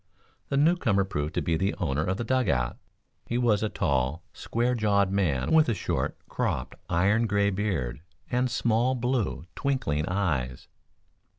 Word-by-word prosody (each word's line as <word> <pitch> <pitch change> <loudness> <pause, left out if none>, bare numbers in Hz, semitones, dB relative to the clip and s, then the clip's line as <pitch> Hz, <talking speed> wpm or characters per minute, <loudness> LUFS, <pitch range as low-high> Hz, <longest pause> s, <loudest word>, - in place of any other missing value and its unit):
The 140 - 0
newcomer 145 - +3
proved 75 -4 -3
to - - 0
be 85 -1 +1
the 95 +4 0
owner 75 -5 -1
of 95 +3 -1
the 120 - -2
dug 130 +2 +1
out. 60 -2 0 0.5
He 120 - -1
was 115 -4 +2
a 110 - 0
tall, 70 +3 0
square 120 +2 -1
jawed 100 -4 +2
man, 85 -10 0
with 160 -4 +5
a 115 - +1
short, - - -2
cropped - - -2 0.2
iron 100 +7 +3
gray 100 -1 +2
beard 80 - -2 0.3
and 125 +1 +1
small 120 +1 +1
blue, 120 - -1
twinkling 125 - -1
eyes. 75 -10 -1
100 Hz, 160 wpm, -27 LUFS, 80-120 Hz, 0.5 s, with